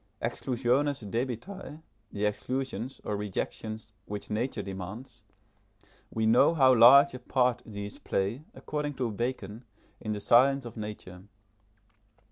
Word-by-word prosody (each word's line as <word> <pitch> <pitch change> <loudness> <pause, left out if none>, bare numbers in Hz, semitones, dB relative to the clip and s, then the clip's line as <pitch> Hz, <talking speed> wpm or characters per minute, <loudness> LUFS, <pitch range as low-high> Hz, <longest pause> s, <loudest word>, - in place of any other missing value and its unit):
Exclusiones 130 +3 0
debitae 125 - -4 0.3
the 105 +1 -2
exclusions, 130 +4 -3
or 105 - -2
rejections, 110 +2 -5
which 105 0 -6
nature 110 0 -2
demands 100 +5 -8 0.9
we 110 0 -1
know 120 +9 +5
how 130 -4 +6
large 130 +4 +8
a 125 - -6
part 125 -1 +1
these 100 -1 -7
play, 100 +9 -2
according 150 -1 -4
to 125 -3 -1
Bacon, 115 -1 -4 0.4
in 110 - -3
the 105 - -4
science 130 +5 +4
of 120 - -8
nature. 105 -4 -8
120 Hz, 120 wpm, -29 LUFS, 105-130 Hz, 0.9 s, large